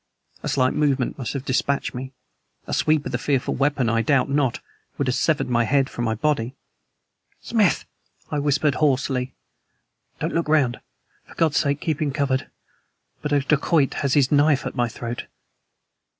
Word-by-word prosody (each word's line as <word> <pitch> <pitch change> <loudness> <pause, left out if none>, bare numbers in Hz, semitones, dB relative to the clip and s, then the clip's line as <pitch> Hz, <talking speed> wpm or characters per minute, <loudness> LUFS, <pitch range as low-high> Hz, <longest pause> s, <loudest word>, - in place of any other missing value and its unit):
A - - -3
slight 130 -1 +2
movement 140 -4 0
must 120 -5 -3
have 140 -1 -4
dispatched 140 +1 0
me; 130 +1 -6 0.5
a - - -5
sweep 155 -2 +2
of - - -4
the - - -1
fearful 135 -4 0
weapon, 135 -2 +1
I 115 0 +2
doubt 135 +3 +2
not, 140 -4 +1 0.4
would 140 - 0
have 125 - +1
severed 150 +3 +1
my 120 -1 +2
head 135 +3 +1
from 120 - -3
my 110 -1 0
body. 130 0 -1 0.8
"Smith!" 210 - +1 0.5
I 150 - 0
whispered 145 0 +2
hoarsely, 130 -2 0 0.8
"don't - - -2
look 165 -2 -1
around. 135 -6 +2 0.5
For - - -16
God's 160 -3 +2
sake 140 0 +1
keep 160 -1 -2
him 150 -2 +1
covered. 135 -2 -1 0.7
But 150 - -3
a 145 -1 +3
dacoit 145 +1 +2
has 140 -2 +1
his 140 -3 +3
knife 145 -2 +3
at - - -3
my 120 -1 +1
throat!" 120 +1 -6
140 Hz, 170 wpm, -23 LUFS, 125-150 Hz, 0.8 s, a